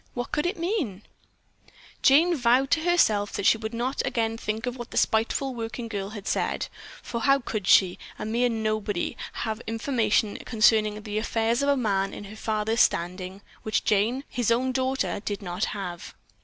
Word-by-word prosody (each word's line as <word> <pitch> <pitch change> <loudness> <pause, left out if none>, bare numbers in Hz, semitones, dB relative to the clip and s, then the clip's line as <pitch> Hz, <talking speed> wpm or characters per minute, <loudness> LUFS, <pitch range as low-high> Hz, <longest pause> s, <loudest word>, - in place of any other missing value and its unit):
What 245 0 -4
could 300 +3 0
it 360 - -2
mean?" 330 - -2 1.0
Jane 330 +6 +5
vowed 255 0 +3
to 330 - +4
herself 270 -12 +2
that 200 - -3
she 225 - +5
would 220 0 -4
not 245 +4 -1
again 225 -1 0
think 220 +1 -3
of 245 0 -3
what 240 -2 -8
the - - -6
spiteful 235 +4 +1
working 230 0 -5
girl 200 -3 -4
had 205 -2 -8
said, - - -1 0.3
for 235 - -4
how 275 +2 +5
could 215 -7 -4
she, 180 -2 +5 0.2
a - - -5
mere 235 +3 +1
nobody, 215 -4 -1 0.2
have 220 0 -3
information 225 -3 +1
concerning 215 -2 +2
the 210 0 -2
affairs 225 +2 0
of 280 - +1
a 280 - +3
man 195 -5 0
of 205 - -8
her 205 +2 -10
father's 220 +1 0
standing, 185 +3 0 0.2
which 215 - 0
Jane, 220 +6 +1
his 240 -3 -1
own 250 +3 +2
daughter, 260 -2 -1
did 205 -1 -4
not 180 +2 -2
have? 180 -4 -6
225 Hz, 180 wpm, -26 LUFS, 210-250 Hz, 1.0 s, Jane